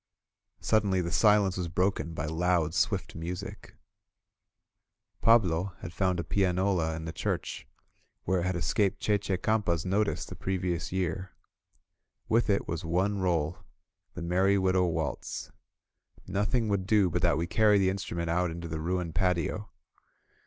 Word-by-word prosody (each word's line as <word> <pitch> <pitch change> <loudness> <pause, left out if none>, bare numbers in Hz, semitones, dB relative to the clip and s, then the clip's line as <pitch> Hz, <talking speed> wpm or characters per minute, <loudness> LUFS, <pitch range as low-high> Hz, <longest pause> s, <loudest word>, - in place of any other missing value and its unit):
Suddenly 100 -4 +2
the 85 0 -3
silence 100 +1 +4
was 90 -2 -2
broken 90 -1 -1
by 70 - -2
loud, 80 0 +1
swift - - 0
music. 85 +2 -7 1.5
Pablo 95 -5 +3
had 90 - -7
found 90 -2 0
a - - -1
pianola 90 -2 +1
in 80 0 -6
the 80 - -4
church, - - -3 0.6
where 95 +1 +1
it 85 - -1
had 95 - -1
escaped 90 +5 +1
Che 105 -1 +1
Che 95 -2 -2
Campa's 95 -4 0
notice 100 +3 0
the - - -8
previous 90 -3 -2
year; 95 0 -2 0.9
with 115 +1 +2
it 100 - +1
was 80 0 -3
one 95 +5 0
roll, 85 -3 0 0.6
the 90 - -5
"Merry 95 +3 +3
Widow 95 -1 +2
Waltz." 80 -6 -3 0.8
Noth 105 +3 0
ing 115 -3 +1
would 100 -2 -1
do 105 -3 +4
but 90 - 0
that 85 -4 +3
we 85 - 0
carry 105 +3 +4
the 95 -1 +3
instrument 85 -3 -4
out 90 +2 +1
into 85 +1 -6
the 80 -1 -4
ruined 90 0 -2
patio. 90 +3 0
90 Hz, 150 wpm, -29 LUFS, 85-100 Hz, 1.5 s, silence